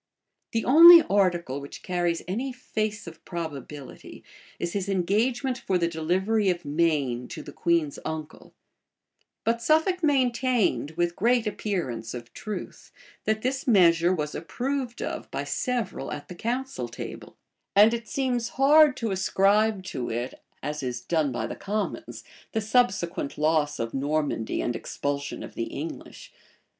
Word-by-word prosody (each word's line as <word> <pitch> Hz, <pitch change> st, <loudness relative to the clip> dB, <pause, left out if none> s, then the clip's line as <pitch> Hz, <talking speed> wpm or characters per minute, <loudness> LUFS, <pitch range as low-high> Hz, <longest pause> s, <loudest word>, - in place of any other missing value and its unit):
The 225 Hz, -, 0 dB
only 335 Hz, +5 st, +10 dB
article 175 Hz, -8 st, +1 dB
which 140 Hz, -, -10 dB
carries 175 Hz, -2 st, -1 dB
any 240 Hz, +9 st, -2 dB
face 215 Hz, -4 st, -3 dB
of 165 Hz, -1 st, -11 dB
probability, 150 Hz, -5 st, -7 dB, 0.3 s
is 170 Hz, 0 st, -3 dB
his 200 Hz, -1 st, -2 dB
engagement 235 Hz, +8 st, 0 dB
for 190 Hz, -6 st, 0 dB
the 170 Hz, -1 st, +1 dB
delivery 190 Hz, +6 st, +1 dB
of 175 Hz, -3 st, -2 dB
Maine 145 Hz, -6 st, 0 dB
to -, -, -8 dB
the -, -, -9 dB
queen's 165 Hz, -4 st, 0 dB
uncle: 160 Hz, -1 st, -7 dB, 0.9 s
but 230 Hz, +1 st, 0 dB
Suffolk 320 Hz, +7 st, +2 dB
maintained, 255 Hz, -, +1 dB
with 175 Hz, 0 st, 0 dB
great 235 Hz, +2 st, +2 dB
appearance 175 Hz, -, -3 dB
of 120 Hz, -1 st, -9 dB
truth, 215 Hz, -1 st, -7 dB, 0.3 s
that 220 Hz, 0 st, 0 dB
this 265 Hz, +2 st, -2 dB
measure 175 Hz, -6 st, +5 dB
was 150 Hz, -5 st, -2 dB
approved 250 Hz, -, -3 dB
of -, -, -5 dB
by -, -, -3 dB
several 245 Hz, -, -2 dB
at 145 Hz, -, -7 dB
the -, -, -6 dB
council 240 Hz, -, -3 dB
table; 120 Hz, -, -9 dB, 0.2 s
[*] -, -, -55 dB
and 210 Hz, +3 st, +7 dB
it 230 Hz, 0 st, -4 dB
seems 245 Hz, -4 st, -1 dB
hard 290 Hz, +1 st, +6 dB
to 225 Hz, -3 st, -2 dB
ascribe 195 Hz, +2 st, +2 dB
to 130 Hz, -9 st, -4 dB
it, 120 Hz, +2 st, -3 dB, 0.3 s
as 150 Hz, +1 st, -3 dB
is 125 Hz, -2 st, -3 dB
done 155 Hz, -3 st, 0 dB
by 120 Hz, -, -2 dB
the -, -, -5 dB
commons, 210 Hz, +2 st, -4 dB, 0.3 s
the 220 Hz, -, +1 dB
subsequent 195 Hz, -, 0 dB
loss 150 Hz, -1 st, +1 dB
of 115 Hz, 0 st, -3 dB
Normandy 140 Hz, -4 st, -1 dB
and 120 Hz, -, -1 dB
expulsion 140 Hz, +3 st, -4 dB
of -, -, -9 dB
the 115 Hz, -, -3 dB
English. 155 Hz, +7 st, -8 dB
185 Hz, 150 wpm, -26 LUFS, 150-235 Hz, 0.9 s, only